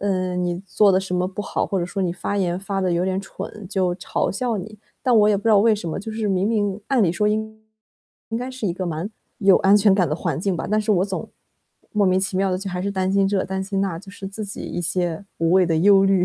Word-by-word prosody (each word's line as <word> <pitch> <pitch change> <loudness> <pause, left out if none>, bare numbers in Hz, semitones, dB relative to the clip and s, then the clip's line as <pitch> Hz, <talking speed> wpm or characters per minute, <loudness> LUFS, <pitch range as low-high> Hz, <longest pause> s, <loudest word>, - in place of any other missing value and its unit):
呃， 185 -2 -1
你 175 -1 -1
做 200 +1 +4
得 185 - +3
什 190 -1 -6
么 180 0 +1
不 195 +2 -5
好， - - -2
或 195 - -1
者 175 - -2
说 195 - -4
你 175 -2 0
发 200 +3 -3
言 180 -2 0
发 195 0 -2
得 185 -2 +1
有 170 +1 +1
点 190 +1 -1
蠢， 205 0 -8
就 185 -3 0
嘲 180 - -1
笑 235 +2 -1
你。 210 +3 -8 0.2
但 250 -2 +3
我 210 0 +5
也 210 - +3
不 200 - -6
知 - - +2
道 215 -2 +6
为 220 +2 +4
什 200 -5 -5
么， - - -3
就 220 +3 -6
是 220 -1 -2
明 190 0 +1
明 205 -2 0
按 265 -4 +3
理 180 - +3
说 210 +5 0
应 220 +1 -1 0.7
应 225 - -2
该 250 +1 -4
是 255 -3 -7
一 175 - 0
个 185 +1 -4
蛮 170 +4 -3 0.3
有 195 -2 +5
安 200 +1 +5
全 205 -1 +5
感 185 -3 +2
的 150 - 0
环 155 -3 -2
境 185 +1 -1
吧， - - -4
但 215 - +3
是 215 0 +1
我 185 -1 +2
总 195 -1 -5 0.6
莫 205 -2 +2
名 185 +1 +3
其 190 0 -1
妙 195 0 +1
地 180 - 0
就 195 0 -5
还 180 - -3
是 200 +2 -2
担 190 0 0
心 195 0 +3
这、 195 -1 +1
担 190 0 -3
心 195 0 -2
那， 190 -4 -1
就 195 +3 -14
是 195 -1 -7
自 210 +2 -6
己 205 - -7
一 175 - -4
些 175 +1 -1
无 165 0 +1
谓 185 -1 +5
的 165 -1 +1
忧 195 +2 +6
虑。 195 -2 +3
195 Hz, 305 characters per minute, -22 LUFS, 180-205 Hz, 0.7 s, 道